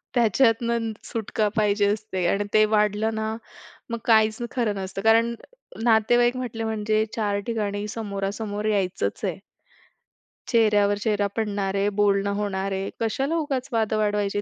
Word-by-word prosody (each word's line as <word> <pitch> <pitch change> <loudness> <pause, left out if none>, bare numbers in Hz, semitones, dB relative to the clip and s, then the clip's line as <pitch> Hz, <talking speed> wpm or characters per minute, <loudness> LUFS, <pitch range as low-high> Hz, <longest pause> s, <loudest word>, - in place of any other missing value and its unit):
त्याच्यातनं 230 -1 +2
सुटका 220 -1 -2
पाहिजे 205 -2 +2
असते 205 -3 -2
आणि 200 +3 +1
ते 215 - +6
वाढलं 210 +1 +1
ना, 220 0 -2 0.5
मग 235 - -2
काहीच 220 -1 +4
खरं 230 -5 0
नसतं. 195 0 -5
कारण 230 +2 +3 0.5
नातेवाईक 240 +2 +4
म्हटले 235 -3 -4
म्हणजे 215 0 0
चार 205 -2 0
ठिकाणी 210 -3 -2
समोरासमोर 205 0 -4
यायचंच 195 -3 -1
आहे. - - -2 1.1
चेहऱ्यावर 210 -3 +3
चेहरा 205 -1 0
पडणार 205 -3 -1
आहे, 200 +1 +2
बोलणं 200 -1 +1
होणार 195 -1 -2
आहे, 195 0 -2
कशाला 270 +8 -1
उगाच 275 -4 -2
वाद 220 -2 0
वाढवायचे. 205 -1 0
215 Hz, 135 wpm, -24 LUFS, 205-225 Hz, 1.1 s, ते